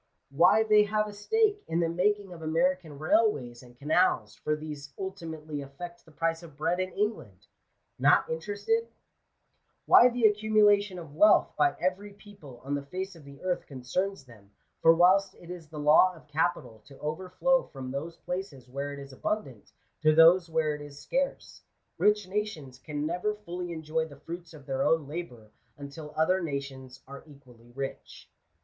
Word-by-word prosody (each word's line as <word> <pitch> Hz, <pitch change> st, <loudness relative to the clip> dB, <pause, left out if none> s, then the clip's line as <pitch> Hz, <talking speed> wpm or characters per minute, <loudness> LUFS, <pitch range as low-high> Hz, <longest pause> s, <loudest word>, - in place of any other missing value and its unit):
Why 175 Hz, +9 st, +5 dB
they 210 Hz, -1 st, +5 dB
have 215 Hz, +1 st, 0 dB
a 210 Hz, -, -8 dB
stake 415 Hz, -, +1 dB
in 165 Hz, -, 0 dB
the 170 Hz, -, +2 dB
making 195 Hz, +3 st, 0 dB
of 165 Hz, -, -11 dB
American 165 Hz, -1 st, 0 dB
railways 145 Hz, -, +1 dB
and 125 Hz, -1 st, -17 dB
canals, 145 Hz, -, +1 dB
for 150 Hz, -, -2 dB
these 150 Hz, -2 st, -8 dB
ultimately 160 Hz, -6 st, -6 dB
affect 170 Hz, +6 st, -9 dB
the 160 Hz, -, -18 dB
price 165 Hz, +2 st, -1 dB
of 160 Hz, -4 st, -14 dB
bread 165 Hz, +4 st, 0 dB
in 185 Hz, 0 st, -2 dB
England. 205 Hz, -, -3 dB, 0.5 s
Not -, -, +4 dB
interested? 205 Hz, -, -1 dB, 1.0 s
Why 245 Hz, -, +8 dB
the 245 Hz, -1 st, -4 dB
accumulation 210 Hz, -2 st, +3 dB
of 160 Hz, -5 st, -9 dB
wealth 210 Hz, +7 st, +5 dB
by 360 Hz, -, +2 dB
every 190 Hz, +3 st, -2 dB
people 195 Hz, -, -14 dB
on 140 Hz, +2 st, -4 dB
the 145 Hz, -, -1 dB
face 185 Hz, +4 st, -5 dB
of 160 Hz, -4 st, -15 dB
the 140 Hz, +2 st, -13 dB
earth 180 Hz, -1 st, 0 dB
f -, -, -30 dB
concerns 140 Hz, +6 st, -3 dB
them; 110 Hz, -5 st, -17 dB, 0.3 s
for 165 Hz, -, +7 dB
whilst 190 Hz, +3 st, +4 dB
it 175 Hz, -, -12 dB
is 175 Hz, -3 st, -9 dB
the 155 Hz, -, -10 dB
law 155 Hz, +5 st, +5 dB
of 160 Hz, -, -17 dB
capital 150 Hz, -6 st, -1 dB
to 135 Hz, -, -14 dB
overflow; 185 Hz, +12 st, 0 dB
from 130 Hz, -2 st, -8 dB
those 160 Hz, +5 st, -5 dB
places 180 Hz, -9 st, -6 dB
where 140 Hz, +3 st, -4 dB
it -, -, -8 dB
is 140 Hz, -1 st, -10 dB
abundant, 140 Hz, -, -4 dB, 0.3 s
to 155 Hz, 0 st, +4 dB
those 170 Hz, +2 st, +6 dB
where 160 Hz, -2 st, +1 dB
it 150 Hz, -, -7 dB
is, 145 Hz, -1 st, -10 dB
scarce, 270 Hz, -, -3 dB, 0.4 s
rich 210 Hz, -2 st, +3 dB
nations 185 Hz, -10 st, -4 dB
can 150 Hz, +1 st, -4 dB
never 180 Hz, +6 st, -1 dB
fully 180 Hz, -4 st, -6 dB
enjoy 160 Hz, 0 st, -2 dB
the 145 Hz, -3 st, -14 dB
fruits 170 Hz, +1 st, -8 dB
of 145 Hz, -3 st, -14 dB
their 135 Hz, 0 st, -2 dB
own 160 Hz, 0 st, +2 dB
labour 125 Hz, -9 st, -7 dB, 0.3 s
until 150 Hz, +2 st, -9 dB
other 185 Hz, +4 st, +2 dB
nations 135 Hz, -4 st, -6 dB
are 140 Hz, +1 st, -10 dB
equally 125 Hz, -5 st, -18 dB
rich. 135 Hz, 0 st, -7 dB
165 Hz, 175 wpm, -28 LUFS, 140-190 Hz, 1.0 s, Why